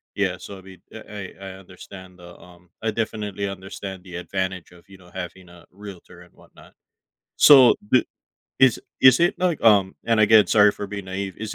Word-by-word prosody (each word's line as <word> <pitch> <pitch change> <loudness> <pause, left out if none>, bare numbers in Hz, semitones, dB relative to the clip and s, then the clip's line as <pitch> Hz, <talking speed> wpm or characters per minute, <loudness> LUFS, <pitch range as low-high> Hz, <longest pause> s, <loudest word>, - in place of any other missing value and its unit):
yeah, 95 -3 -1
so, 100 - -10
I - - -14
mean, 95 -1 -16
I 105 -3 -10
I 100 - -10
I - - -8
understand 95 0 -14
the, 85 -1 -14
um 90 0 -19
I 115 - -2
definitely 105 -3 -4
understand 95 0 -8
the 90 -2 -12
advantage 95 -1 -5
of, 90 +2 -21
you 95 - -15
know, 90 -1 -20
having 90 0 -9
a 85 0 -17
realtor 95 -3 -13
and 90 - -20
whatnot, - - -20 0.6
so 135 -4 +7 0.2
the 130 - +3 0.5
is 130 -1 +3 0.2
is 130 +3 +6
it 175 - +2
like, 175 -4 -1
um 100 -4 +3
and 115 -1 +1
again, 110 0 +5
sorry 105 -1 +4
for 100 - -8
being 100 -1 -8
naive, 95 0 -6
is 105 0 -7
95 Hz, 190 wpm, -22 LUFS, 90-105 Hz, 0.6 s, so